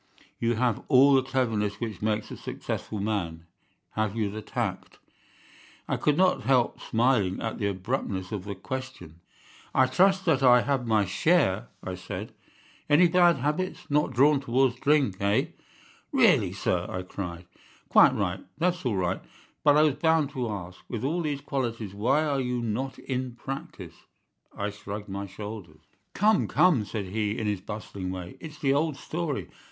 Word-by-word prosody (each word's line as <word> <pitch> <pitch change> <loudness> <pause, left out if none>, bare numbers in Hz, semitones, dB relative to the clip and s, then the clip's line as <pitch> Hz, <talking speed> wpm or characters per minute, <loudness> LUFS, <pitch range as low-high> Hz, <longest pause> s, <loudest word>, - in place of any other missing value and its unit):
You 115 0 +1
have 120 -1 +1
all 140 0 +6
the 135 - +5
cleverness 115 -6 -1
which 110 -6 -5
makes 105 0 -1
a - - -5
successful 105 - -5
man. 90 -6 -2 0.5
Have 110 -1 -1
you 105 -3 -1
the 110 +1 -6
tact?' - - -4 0.9
"I - - 0
could 150 -1 +1
not 185 0 +3
help 130 -3 +2
smiling 115 -5 +1
at 115 +1 -4
the 100 - 0
abruptness 95 -1 -3
of 100 -3 -4
the 100 -1 -5
question. 130 - -7 0.6
"'I 130 - +6
trust 190 +8 +3
that 150 -6 +3
I 125 -2 +7
have 135 -3 -1
my 110 -2 +3
share,' 100 - +2 0.2
I 95 - -4
said. 95 +3 -6 0.6
"'Any 170 +4 +6
bad 175 -1 +5
habits? 150 +6 -3
Not 150 +1 +3
drawn 140 +3 +4
towards 130 -1 +1
drink, 140 -10 +2
eh?' 100 0 +1 0.6
"'Really, - - +4
sir!' 90 0 -1
I 90 - -4
cried. 90 -2 -6 0.4
"'Quite - - +6
right! 95 -2 -2
That's 175 0 0
all 120 -7 0
right! 90 -1 -1 0.4
But 145 -1 +6
I 155 - +6
was 155 -3 +3
bound 160 -2 +2
to 125 -4 -3
ask. 90 -3 -6
With 115 -1 -4
all 165 +6 0
these 145 -3 -2
qualities, 115 -8 -3
why 125 +9 +2
are 140 -3 0
you 125 -1 -1
not 125 +4 -3
in 130 -2 -4
practice?' 135 - -8 0.5
"I 100 +1 -2
shrugged 105 0 -7
my 100 +1 -4
shoulders. 100 -5 -9 0.3
"'Come, 215 +1 +3
come!' 155 - +3
said 105 -1 -4
he, 105 +2 -2
in 110 - -2
his 105 -3 -1
bustling 100 -2 -6
way. 90 -1 -6
'It's 150 -2 -9
the 135 -2 +1
old 150 0 0
story. 155 -4 -3
115 Hz, 170 wpm, -27 LUFS, 100-140 Hz, 0.9 s, I